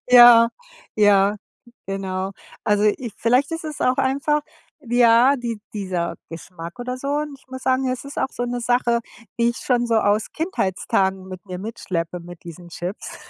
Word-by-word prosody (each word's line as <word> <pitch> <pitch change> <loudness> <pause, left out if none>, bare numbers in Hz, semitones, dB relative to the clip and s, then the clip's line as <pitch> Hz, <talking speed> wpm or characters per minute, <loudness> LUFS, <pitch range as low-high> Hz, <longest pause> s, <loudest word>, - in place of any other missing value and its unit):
Ja, 240 -1 +9 0.5
ja, 205 -1 +4 0.5
genau. 190 0 -3 0.3
Also, 210 0 +2
ich 215 +1 0
vielleicht 255 +6 +2
ist 330 0 -4
es 305 -2 -6
auch 255 0 +2
einfach, 280 +3 +1 0.4
ja, 240 +3 +5
die 235 -3 -4
dieser 180 -5 -3
Geschmack 170 +1 -9
oder 250 +1 -4
so, 275 - -7
und 290 -1 -2
ich - - -27
muss 260 0 -8
sagen, 260 0 +1
es 255 +1 -3
ist 280 - -7
auch - - 0
so 245 - -4
'ne 245 0 -3
Sache, 240 0 +2 0.4
die 235 0 +3
ich 240 - -7
schon 240 -2 +1
so 230 - +1
aus 210 0 +1
Kindheitstagen 190 - -1
mit 185 0 -9
mir 180 -1 -6
mitschleppe, 180 -5 -4
mit 175 0 -12
diesen 175 +1 -10
Chips. 175 +4 -6
230 Hz, 170 wpm, -22 LUFS, 190-255 Hz, 0.5 s, Ja